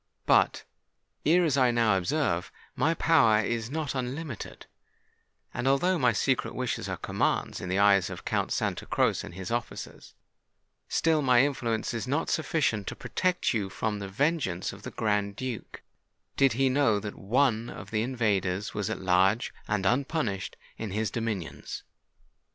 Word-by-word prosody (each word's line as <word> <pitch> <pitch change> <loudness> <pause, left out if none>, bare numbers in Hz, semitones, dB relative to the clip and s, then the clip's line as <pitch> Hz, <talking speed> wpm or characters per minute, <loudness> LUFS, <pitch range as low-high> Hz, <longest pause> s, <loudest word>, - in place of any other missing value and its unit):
But, - - +3 0.6
as 165 -3 +4
I 130 -2 +5
ere - - +3
now 115 -4 +3
observed, 95 - 0 0.3
my 160 +5 +2
power 115 -12 +4
is 115 +1 -2
not 155 0 -2
unlimited; 130 -1 -5 0.9
and 120 +2 -2
although 170 +7 +3
my 125 -3 +4
secret 105 - 0
wishes - - -2
are - - -3
commands - - -1
in 95 - -5
the 95 - 0
eyes 100 -2 +4
of - - -8
Count - - 0
Santa - - -1
Croce - - +1
and - - -9
his 95 +2 -6
officers, 120 -1 -5 0.7
still 160 -2 +2
my 125 -2 +5
influence 120 -6 -1
is 115 +1 -3
not 145 +5 0
sufficient 140 - 0
to - - -4
protect 180 -5 0
you 105 -4 -1
from 105 +1 -2
the 100 - -5
vengeance 120 - 0
of - - -12
the - - -6
Grand 105 -2 -1
Duke, 125 -2 -6 0.5
did 135 -4 +4
he 135 +3 +2
know 130 -6 +3
that 105 0 -6
one 120 +1 +1
of - - -9
the 110 -1 +1
invaders 100 -6 0
was 105 -2 -2
at - - -3
large 95 +4 +2
and 105 -2 0
unpunished 120 - 0 0.2
in 110 - -3
his 110 +3 -1
dominions. 110 -8 -4
115 Hz, 160 wpm, -28 LUFS, 100-140 Hz, 0.9 s, I